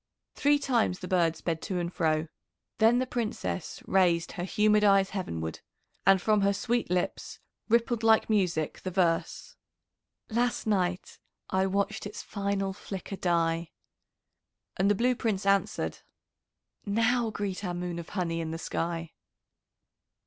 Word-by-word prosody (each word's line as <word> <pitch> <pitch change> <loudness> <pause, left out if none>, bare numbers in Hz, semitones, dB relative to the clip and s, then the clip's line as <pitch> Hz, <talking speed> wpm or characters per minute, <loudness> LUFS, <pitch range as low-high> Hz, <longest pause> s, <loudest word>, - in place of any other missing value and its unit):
Three 290 +1 +3
times 240 -9 +1
the 180 - -7
bird 170 -3 +2
sped 165 -1 -3
to 185 - -3
and 175 0 -2
fro. 155 -1 +1 0.5
Then 225 +2 +5
the 255 - +1
Princess 215 - -4
raised 175 -3 +2
her 175 - -5
humid 210 +3 +3
eyes 195 -1 +4
heavenward, 80 - -4 0.5
and 195 -1 +7
from 210 +2 +2
her 200 0 +3
sweet 240 +2 -1
lips 180 0 -2 0.3
rippled 235 0 +2
like 225 -1 +4
music 180 -8 0
the 185 - -3
verse: 175 -3 -1 0.7
"Last 240 +2 0
night 185 -4 -1 0.3
I 190 0 +2
watched 200 +2 -1
its 205 - -8
final 200 -1 -2
flicker 195 0 -6
die." 170 -2 0 1.1
And 190 +2 +2
the 205 - +4
Blue 245 +5 +2
Prince 220 -5 -2
answered: 200 0 +1 0.8
"Now 230 +3 +1
greet 205 -2 -4
our 180 -2 -2
moon 175 -1 -4
of 165 - -8
honey 170 -4 -2
in 160 - -4
the 165 - -4
sky." 165 0 -3
195 Hz, 140 wpm, -29 LUFS, 175-215 Hz, 1.1 s, and